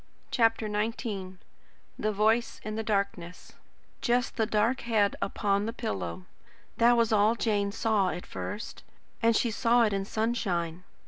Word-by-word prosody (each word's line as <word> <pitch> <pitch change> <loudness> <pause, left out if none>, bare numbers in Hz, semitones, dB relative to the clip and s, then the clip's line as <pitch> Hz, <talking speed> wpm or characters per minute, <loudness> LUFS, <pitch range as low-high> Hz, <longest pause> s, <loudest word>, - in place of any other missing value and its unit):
CHAPTER 225 -2 +2
XIX 210 -2 -3 0.7
THE 215 - 0
VOICE 220 +3 +1
IN 215 - -4
THE 220 - -2
DARKNESS 200 -5 -3 0.5
Just 245 0 +1
the 220 -3 +1
dark 225 +4 +1
head 215 -4 +2
upon 200 +1 0
the 230 - -3
pillow. 90 - -4 0.5
That 240 +1 +5
was 230 -1 +2
all 215 +1 +4
Jane 205 -3 0
saw 210 -3 +1
at 180 - -5
first, 210 +2 -6 0.4
and 230 0 +4
she 235 - +2
saw 235 +1 +3
it 215 -3 +1
in 195 0 -1
sunshine. 185 -7 -1
215 Hz, 145 wpm, -28 LUFS, 200-230 Hz, 0.7 s, That